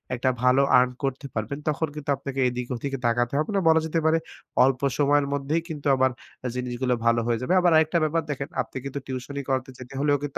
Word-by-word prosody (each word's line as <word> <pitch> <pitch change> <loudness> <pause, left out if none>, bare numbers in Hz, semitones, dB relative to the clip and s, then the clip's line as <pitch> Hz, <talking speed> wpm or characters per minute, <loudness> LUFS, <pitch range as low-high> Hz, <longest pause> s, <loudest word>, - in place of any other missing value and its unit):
একটা 125 +1 +1
ভালো 125 +2 +5 0.2
আর্ন 125 0 +2
করতে 135 +1 -2
পারবেন, 110 +5 -3
তখন 155 +1 0
কিন্তু 145 -1 -7
আপনাকে 135 -1 -5
এদিক 125 0 -3
ওদিকে 135 +3 -3
তাকাতে 120 +1 +1
হবে 155 - -1
না। 195 - +4
বলা 160 0 +6
যেতে 160 +1 0
পারে 160 +1 +4 0.5
অল্প 130 0 +2 0.2
সময়ের 145 0 +3
মধ্যেই 145 +4 0
কিন্তু 150 -2 -4
আবার 130 0 +3 0.4
জিনিসগুলো 125 0 -1
ভালো 115 0 +4
হয়ে 120 -1 +1
যাবে। 130 +9 0
আবার 175 -1 +4
আরেকটা 160 +2 +3
ব্যাপার 160 +1 +1
দেখেন, 140 0 -4
আপনি - - -8
কিন্তু 140 +1 -4
টিউশনি 135 +2 -5
করাতে 130 0 -1
যেতে 130 +1 -10
হলেও 145 0 +3
কিন্তু 145 - -4
135 Hz, 210 wpm, -25 LUFS, 125-150 Hz, 0.5 s, বলা